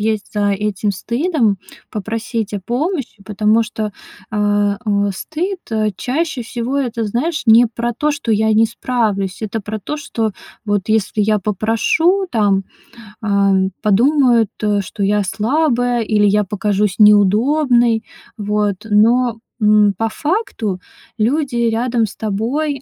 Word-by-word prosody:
есть 215 Hz, -1 st, -2 dB
за 205 Hz, -1 st, +1 dB
этим 205 Hz, 0 st, -1 dB
стыдом- 235 Hz, -, 0 dB, 0.3 s
попросить 220 Hz, +1 st, -4 dB
о 205 Hz, -, -3 dB
помощи, 250 Hz, -, -3 dB
потому 210 Hz, +3 st, +2 dB
что, 215 Hz, -1 st, -4 dB, 0.4 s
а, 205 Hz, -1 st, +1 dB
э, 205 Hz, -1 st, +1 dB
стыд, 360 Hz, -, -4 dB
э, 215 Hz, -1 st, 0 dB
чаще 290 Hz, 0 st, -2 dB
всего 240 Hz, +3 st, -3 dB
это, 235 Hz, -4 st, -2 dB
знаешь, 260 Hz, +10 st, -1 dB
не 230 Hz, +2 st, +7 dB
про 235 Hz, +1 st, -3 dB
то, 300 Hz, +6 st, 0 dB
что 285 Hz, -6 st, -2 dB
я 220 Hz, +1 st, +2 dB
не 220 Hz, +1 st, +4 dB
справлюсь. 215 Hz, -5 st, -2 dB
Это 220 Hz, +1 st, -3 dB
про 215 Hz, +2 st, -5 dB
то, 295 Hz, +9 st, -5 dB
что 230 Hz, -7 st, -3 dB, 0.3 s
вот 205 Hz, -2 st, -1 dB
если 215 Hz, -1 st, +1 dB
я 215 Hz, +1 st, +2 dB
попрошу, 225 Hz, -, +1 dB
там, 200 Hz, -4 st, +1 dB, 0.6 s
ам, 200 Hz, -2 st, +2 dB
подумают, 235 Hz, +1 st, +3 dB
а, 205 Hz, -1 st, +1 dB
что 200 Hz, +1 st, -5 dB
я 205 Hz, +1 st, +2 dB
слабая 245 Hz, -, 0 dB
или 210 Hz, -1 st, +2 dB
я 210 Hz, +1 st, +3 dB
покажусь 205 Hz, 0 st, -1 dB
неудобной, 230 Hz, +4 st, +4 dB, 0.3 s
вот. 210 Hz, -1 st, 0 dB
Но, 230 Hz, +3 st, +3 dB, 0.2 s
м, 210 Hz, -1 st, +4 dB
по 225 Hz, +1 st, 0 dB
факту, 295 Hz, -, -2 dB, 0.4 s
люди 265 Hz, +4 st, 0 dB
рядом 230 Hz, 0 st, 0 dB
с 210 Hz, -, -9 dB
тобой, 250 Hz, +7 st, -2 dB
220 Hz, 135 wpm, -17 LUFS, 205-245 Hz, 0.6 s, не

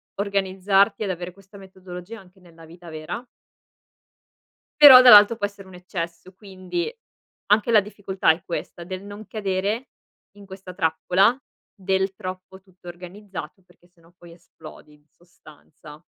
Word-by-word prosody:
organizzarti 200 Hz, +1 st, 0 dB
ad 200 Hz, -, -3 dB
avere 180 Hz, 0 st, -7 dB
questa 195 Hz, +1 st, -18 dB
metodologia 190 Hz, +2 st, -11 dB
anche 190 Hz, -1 st, -20 dB
nella 165 Hz, -2 st, -18 dB
vita 170 Hz, +2 st, -16 dB
vera 160 Hz, +10 st, -7 dB, 1.6 s
però 265 Hz, -4 st, +11 dB
dall'alto 220 Hz, -3 st, +8 dB
può 205 Hz, -, -1 dB
essere 200 Hz, -1 st, -10 dB
un 190 Hz, -, -14 dB
eccesso. 175 Hz, 0 st, -7 dB
Quindi, 195 Hz, -, -6 dB, 0.5 s
anche 210 Hz, +3 st, +2 dB
la 215 Hz, -2 st, +6 dB
difficoltà 195 Hz, -3 st, -1 dB
è 160 Hz, -, -5 dB
questa 170 Hz, 0 st, -7 dB
del 185 Hz, +2 st, -8 dB
non 205 Hz, +1 st, -11 dB
cadere 205 Hz, +3 st, -3 dB, 0.5 s
in 200 Hz, -, -14 dB
questa 190 Hz, -1 st, -11 dB
trappola 190 Hz, +5 st, +1 dB, 0.4 s
del 190 Hz, -1 st, -2 dB
"troppo, 185 Hz, 0 st, -9 dB
tutto 185 Hz, -2 st, -21 dB
organizzato" 185 Hz, +2 st, -10 dB
perché 175 Hz, -, -26 dB
se 175 Hz, -1 st, -31 dB
no 165 Hz, +1 st, -24 dB
poi 170 Hz, -1 st, -15 dB
esplodi, 155 Hz, -2 st, -16 dB
in 150 Hz, 0 st, -25 dB
sostanza. 155 Hz, -2 st, -18 dB
190 Hz, 140 wpm, -22 LUFS, 175-200 Hz, 1.6 s, però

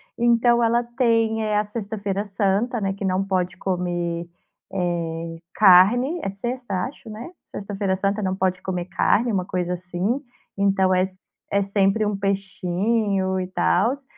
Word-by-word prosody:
Então, 235 Hz, 0 st, +3 dB
ela 235 Hz, +1 st, +3 dB
tem 225 Hz, -3 st, +2 dB
a 210 Hz, -, +3 dB
sexta-feira 205 Hz, -2 st, -3 dB
santa, 205 Hz, +4 st, 0 dB
né, 195 Hz, -1 st, -1 dB
que 200 Hz, -, -7 dB
não 190 Hz, 0 st, +1 dB
pode 185 Hz, -2 st, -1 dB
comer, 175 Hz, -2 st, -2 dB, 0.4 s
eh, 165 Hz, -2 st, -2 dB, 0.2 s
carne. 215 Hz, -, +6 dB
É -, -, -1 dB
sexta, 200 Hz, -2 st, -3 dB
acho, 255 Hz, -3 st, -10 dB
né? 225 Hz, +10 st, -8 dB, 0.2 s
Sexta-feira 200 Hz, -1 st, -2 dB
santa 200 Hz, +2 st, -1 dB
não 190 Hz, -1 st, -1 dB
pode 185 Hz, -1 st, 0 dB
comer 180 Hz, -2 st, -3 dB
carne, 220 Hz, +5 st, +2 dB
uma 185 Hz, -3 st, 0 dB
coisa 180 Hz, -1 st, -2 dB
assim, 180 Hz, +8 st, -2 dB, 0.3 s
então 195 Hz, -1 st, +2 dB
é 185 Hz, -, +3 dB, 0.5 s
é 200 Hz, 0 st, +2 dB
sempre 195 Hz, +2 st, +2 dB
um 205 Hz, -, 0 dB
peixinho 195 Hz, 0 st, 0 dB
e 185 Hz, -, -3 dB
tals, 185 Hz, -, +1 dB
195 Hz, 145 wpm, -23 LUFS, 185-220 Hz, 0.5 s, carne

